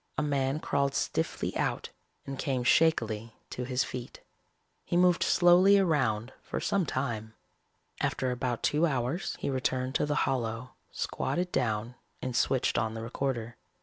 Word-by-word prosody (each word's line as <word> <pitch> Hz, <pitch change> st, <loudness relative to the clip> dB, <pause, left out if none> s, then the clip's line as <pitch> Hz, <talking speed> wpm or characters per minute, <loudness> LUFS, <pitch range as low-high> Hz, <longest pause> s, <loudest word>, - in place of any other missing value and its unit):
A 145 Hz, -, +1 dB
man 140 Hz, 0 st, 0 dB
crawled 140 Hz, -3 st, 0 dB
stiffly -, -, -1 dB
out -, -, -1 dB, 0.4 s
and 135 Hz, -1 st, -6 dB
came 130 Hz, -4 st, -1 dB
shakily 115 Hz, -7 st, +2 dB, 0.2 s
to 125 Hz, -, -4 dB
his 125 Hz, 0 st, +1 dB
feet. 125 Hz, -1 st, -7 dB, 0.6 s
He 175 Hz, -, -1 dB
moved 180 Hz, -1 st, +4 dB
slowly 180 Hz, +3 st, +6 dB
around 130 Hz, -, +1 dB
for -, -, -4 dB
some 195 Hz, -5 st, 0 dB
time. 110 Hz, -4 st, -3 dB, 0.6 s
After 130 Hz, -1 st, 0 dB
about 125 Hz, -1 st, -2 dB
two 155 Hz, +3 st, +3 dB
hours 135 Hz, +5 st, -1 dB
he -, -, -2 dB
returned 130 Hz, 0 st, -1 dB
to 150 Hz, -, +1 dB
the 145 Hz, -, 0 dB
hollow, 120 Hz, -1 st, -2 dB, 0.2 s
squatted 180 Hz, +1 st, -2 dB
down 115 Hz, -2 st, -1 dB, 0.3 s
and 130 Hz, -2 st, -4 dB
switched 130 Hz, +1 st, +2 dB
on 110 Hz, 0 st, -2 dB
the 115 Hz, -, -5 dB
recorder. 120 Hz, -1 st, -3 dB
130 Hz, 150 wpm, -29 LUFS, 120-150 Hz, 0.6 s, slowly